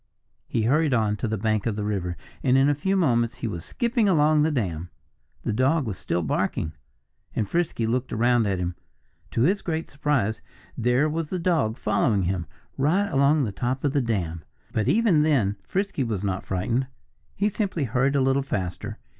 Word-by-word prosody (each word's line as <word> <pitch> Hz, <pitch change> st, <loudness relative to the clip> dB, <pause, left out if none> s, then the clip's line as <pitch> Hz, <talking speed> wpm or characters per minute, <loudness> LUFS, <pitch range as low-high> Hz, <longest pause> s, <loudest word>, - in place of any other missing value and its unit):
He 115 Hz, -, 0 dB
hurried 145 Hz, +3 st, +3 dB
on 110 Hz, -2 st, +1 dB
to 115 Hz, -, -2 dB
the 110 Hz, 0 st, -1 dB
bank 110 Hz, 0 st, 0 dB
of 110 Hz, -, -1 dB
the 105 Hz, -, -3 dB
river; 95 Hz, -5 st, -2 dB, 0.2 s
and 130 Hz, 0 st, +3 dB
in 135 Hz, +1 st, +5 dB
a 145 Hz, -, +4 dB
few 190 Hz, +7 st, 0 dB
moments 120 Hz, -9 st, +2 dB
he -, -, -4 dB
was 85 Hz, -6 st, -5 dB
skipping 235 Hz, -, 0 dB
along 155 Hz, -3 st, +4 dB
the 155 Hz, -, +3 dB
dam. 90 Hz, -, -2 dB, 0.5 s
The -, -, -1 dB
dog 135 Hz, +6 st, +2 dB
was 105 Hz, -4 st, -3 dB
still 85 Hz, 0 st, -2 dB
barking. 75 Hz, +1 st, -1 dB, 0.6 s
And 105 Hz, -, 0 dB
Frisky 165 Hz, -, 0 dB
looked 125 Hz, +3 st, -1 dB
around 120 Hz, 0 st, +3 dB
at 95 Hz, -2 st, 0 dB
him. 90 Hz, 0 st, -2 dB, 0.6 s
To 115 Hz, -, -1 dB
his 195 Hz, +7 st, +2 dB
great 165 Hz, -1 st, -3 dB
surprise, 140 Hz, -8 st, 0 dB, 0.3 s
there 125 Hz, +5 st, +2 dB
was 155 Hz, 0 st, -2 dB
the 185 Hz, -, -2 dB
dog 165 Hz, -11 st, +1 dB
following 105 Hz, -8 st, +1 dB
him, 90 Hz, -2 st, -1 dB, 0.3 s
right 180 Hz, +9 st, +2 dB
along 140 Hz, +1 st, +3 dB
the 110 Hz, -, -1 dB
top 125 Hz, +6 st, -2 dB
of 140 Hz, -2 st, +1 dB
the 145 Hz, -, +2 dB
dam. 90 Hz, -9 st, -2 dB, 0.3 s
But 110 Hz, -2 st, 0 dB
even 215 Hz, -9 st, +4 dB
then 125 Hz, -10 st, +2 dB
Frisky 195 Hz, -7 st, -1 dB
was 105 Hz, -5 st, -2 dB
not 95 Hz, -2 st, -2 dB
frightened. 115 Hz, +8 st, 0 dB, 0.5 s
He 205 Hz, -, +1 dB
simply 200 Hz, -6 st, -1 dB
hurried 135 Hz, +3 st, +1 dB
a 140 Hz, -, +3 dB
little 135 Hz, +1 st, +2 dB
faster. 95 Hz, -9 st, -4 dB
125 Hz, 190 wpm, -25 LUFS, 105-150 Hz, 0.6 s, in